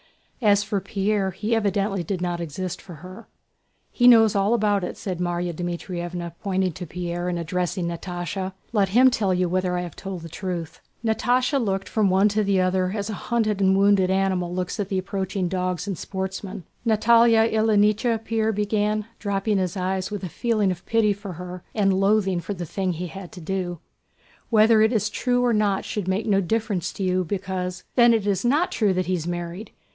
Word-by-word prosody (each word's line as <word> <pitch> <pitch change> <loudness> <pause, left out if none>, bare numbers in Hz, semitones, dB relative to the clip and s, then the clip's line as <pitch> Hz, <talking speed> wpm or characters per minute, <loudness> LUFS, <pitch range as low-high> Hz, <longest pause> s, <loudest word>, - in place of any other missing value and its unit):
As 205 -2 +4
for 200 -1 -2
Pierre, 200 0 0
he 210 +5 -3
evidently 200 -2 0
did 185 +2 -3
not 175 -1 -2
exist 175 +3 -5
for 180 -3 -11
her. 185 +8 -11 0.6
"He 245 - +3
knows 225 -3 +7
all 200 +4 +3
about 205 -3 +1
it," - - -4
said 185 -3 -4
Márya 175 0 -1
Dmítrievna 175 0 -4
pointing 190 -2 0
to 180 +2 -8
Pierre 175 +1 -3
and 175 - -2
addressing 180 +1 -2
Natásha. 175 +2 -4 0.2
"Let 200 -3 +2
him 255 +6 +6
tell 210 -6 0
you 180 0 +1
whether 180 0 0
I - - -1
have 175 -3 -7
told 190 -3 -6
the 165 - -8
truth." 175 -2 -5 0.2
Natásha 250 +4 +1
looked 195 -2 -1
from 210 -3 +1
one 190 +2 +4
to 210 +1 +1
the 195 -1 +2
other 185 0 +1
as 205 +1 -3
a 200 - -8
hunted 215 -4 +1
and 190 0 +4
wounded 200 -2 +4
animal 190 -2 0
looks 185 +3 -3
at 200 -2 -2
the 195 - -1
approaching 190 0 -2
dogs 180 -1 -2
and 200 -2 -3
sportsmen. 190 +2 -5 0.2
"Natálya 230 +1 +4
Ilyníchna," 220 +1 +2
Pierre 220 -1 +1
began, 210 0 0
dropping 200 0 0
his 185 0 -2
eyes 185 0 -1
with 205 -2 -5
a 180 - -3
feeling 215 -1 0
of 175 -1 -6
pity 220 -2 +3
for 200 -1 -8
her 180 +1 -8
and 195 -3 +3
loathing 195 -1 +2
for 200 +4 -5
the 175 -1 -5
thing 185 +2 -2
he 175 +2 -4
had 185 +1 -8
to 180 - -9
do, 175 0 -3 0.7
"whether 220 -1 +5
it 220 +1 +4
is 215 -2 0
true 245 +1 +1
or 240 - +3
not 205 -2 +1
should 205 -4 -3
make 190 +3 0
no 195 -2 +3
difference 205 -2 -1
to 195 - -4
you, 185 0 +1
because..." 185 -1 -4
"Then 240 -2 +6
it 215 -3 -1
is 200 -3 0
not 295 +9 +2
true 205 -4 +1
that 185 0 0
he's 175 -2 -2
married!" 175 +4 -5
195 Hz, 195 wpm, -24 LUFS, 180-215 Hz, 0.7 s, knows